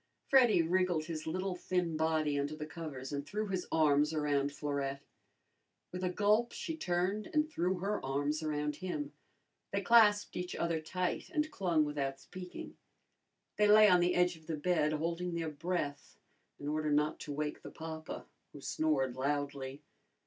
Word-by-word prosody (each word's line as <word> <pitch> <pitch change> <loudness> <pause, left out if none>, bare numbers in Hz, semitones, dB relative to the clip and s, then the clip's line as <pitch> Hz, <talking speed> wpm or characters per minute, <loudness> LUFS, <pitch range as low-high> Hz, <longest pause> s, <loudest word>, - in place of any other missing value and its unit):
Freddy 245 -10 +6
wriggled 175 -2 +1
his 155 -1 -5
little 185 +3 -2
thin 180 -2 -1
body 155 -2 +1
under 145 +2 -2
the 155 0 -5
covers 150 -4 -7
and 140 0 -2
threw 210 +8 -3
his 185 -2 -2
arms 150 -1 +3
around 145 -2 +1
Florette. 140 -1 -3 0.9
With 180 +1 -5
a 180 - +1
gulp, 210 +5 +2
she 325 - -4
turned 190 - -1
and 305 -2 +2
threw 185 - 0
her 200 +4 -2
arms 145 +3 -1
around 150 -1 -2
him. 285 +11 -4 0.6
They - - 0
clasped 215 -3 +5
each 180 0 -3
other 170 -2 0
tight 180 +3 -2
and 310 -2 -1
clung 170 -6 +2
without 140 -2 -2
speaking. 180 -1 -9 0.8
They 210 0 +5
lay 215 +1 +8
on 180 -3 +6
the 175 +1 +2
edge 180 0 +3
of 160 -1 -18
the 160 -2 -2
bed, 155 -1 +2
holding 170 +3 -2
their 165 -2 -2
breath 150 -2 -3 0.4
in 145 - -7
order 155 0 0
not 150 +1 +2
to 150 - -6
wake 150 +1 -3
the - - -8
papa 160 -1 -7 0.3
who 145 - -9
snored 135 -5 0
loudly. 140 0 -2
160 Hz, 165 wpm, -33 LUFS, 150-185 Hz, 0.9 s, lay